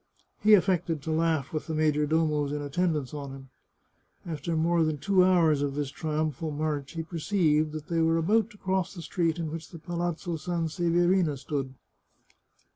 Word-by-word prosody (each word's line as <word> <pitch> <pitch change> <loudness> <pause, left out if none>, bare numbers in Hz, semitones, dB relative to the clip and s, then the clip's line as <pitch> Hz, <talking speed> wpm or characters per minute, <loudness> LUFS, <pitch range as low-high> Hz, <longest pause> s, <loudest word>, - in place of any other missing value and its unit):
He 215 0 +7
affected 175 -5 +1
to 160 - -3
laugh 160 -3 0
with 155 - -3
the 160 - -2
major 150 -1 +2
domos 150 -2 +1
in 145 0 -3
attendance 150 -2 -1
on 145 -2 -5
him. 135 -1 -11 0.8
After 165 -1 -3
more 165 +1 +2
than 155 -1 0
two 185 +5 +3
hours 165 -6 +4
of 140 -1 -1
this 145 -2 -2
triumphal 155 0 -2
march 150 -2 -3
he 165 -1 -3
perceived 160 -2 +1
that 155 -1 -6
they 165 0 0
were 165 0 +3
about 215 +6 +2
to 210 - -16
cross 190 0 -1
the 170 - -7
street 165 -2 0
in 165 -3 -3
which 165 0 -7
the 170 - -10
Palazzo 175 0 -3
Sanseverina 170 0 +1
stood. 135 -1 -4
160 Hz, 175 wpm, -28 LUFS, 150-175 Hz, 0.8 s, He